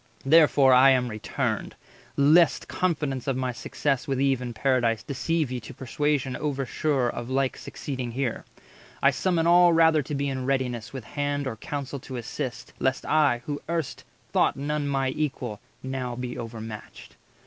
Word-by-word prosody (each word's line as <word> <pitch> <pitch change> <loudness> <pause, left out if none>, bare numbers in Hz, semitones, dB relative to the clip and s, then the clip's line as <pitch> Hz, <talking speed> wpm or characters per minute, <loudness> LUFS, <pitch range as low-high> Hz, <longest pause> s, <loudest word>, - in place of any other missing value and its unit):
Therefore 145 -3 +6
I 130 +2 +7
am 125 -2 +3
returned, 110 -1 -3 0.4
lest 155 +4 +4
confidence 150 -8 -1
140 - - +2
Of 130 -1 -1
my 130 -1 -1
success 135 +3 -2
with 135 -2 -1
Eve 135 -2 +2
in 125 -1 -4
Paradise 120 -2 +1
Deceive 155 0 -1
ye 125 - -2
to 125 +3 -11
persuasion 135 0 -1
over 140 -3 -2
sure 135 -1 0
Of 120 0 -4
like 130 0 0
succeeding 130 -4 -6
here. 125 -2 -2 0.6
I 140 - +6
summon 165 +4 0
all 175 0 +6
Rather 160 -1 +5
to 145 +2 -5
be 140 0 -1
in 130 -1 -3
readiness 125 -4 -1
with 130 -3 -7
hand 145 +3 -2
Or 130 - -3
counsel 140 +3 -5
to 130 +1 -8
assist, 125 +2 -5
lest 130 0 0
I, 145 -6 +2
who 145 -1 -4
erst 165 -5 -3 0.3
Thought - - +3
none 145 +1 -2
my 135 -1 0
equal, 130 -7 -3 0.2
now 130 -2 -3
be 125 0 -5
overmatched." 110 -2 -8
135 Hz, 170 wpm, -26 LUFS, 125-145 Hz, 0.6 s, I